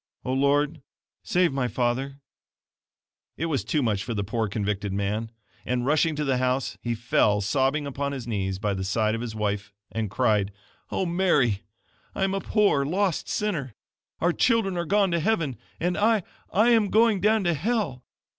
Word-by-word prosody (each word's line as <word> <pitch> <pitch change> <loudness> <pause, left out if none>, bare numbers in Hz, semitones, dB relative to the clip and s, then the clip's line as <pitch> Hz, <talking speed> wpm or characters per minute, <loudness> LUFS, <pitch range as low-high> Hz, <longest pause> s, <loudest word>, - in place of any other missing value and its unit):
"O 130 - -1
Lord, 145 +3 +2 0.4
save 180 -4 +2
my 130 -2 0
father!" 130 +4 -1 1.2
It 165 - -1
was 155 -5 -1
too 150 -3 0
much 105 -4 0
for 115 - -4
the 100 - -1
poor 110 +2 -1
convicted 100 0 -2
man, 100 +3 -2 0.3
and, 125 -1 -1
rushing 155 +2 +2
to 150 - -1
the 135 -2 +1
house 130 +1 0
he 120 -1 -2
fell, 110 -2 +2
sobbing 135 +8 +1
upon 140 0 -3
his 135 -4 -5
knees 95 -4 -2
by 105 0 -1
the 95 -1 -3
side 110 +3 +1
of 115 - -2
his 115 -2 -5
wife 105 -1 -2 0.2
and 110 -2 -2
cried: 105 -2 +1 0.4
"O 190 - -1
Mary, 160 - +2 0.5
I - - 0
am 195 0 +1
a 195 - -1
poor, 205 -10 +2
lost 180 +4 0
sinner! 150 - -2 0.4
Our 175 +1 +2
children 225 -5 +2
are 170 0 -1
going 200 +1 +2
to 170 - +1
heaven, 165 - 0 0.2
and 175 +1 0
I 215 -1 +3 0.3
I 215 +4 +4
AM 220 -4 +4
GOING 220 -2 +4
DOWN 215 0 +3
TO 175 -1 +2
HELL! 165 - -1
135 Hz, 180 wpm, -26 LUFS, 110-175 Hz, 1.2 s, I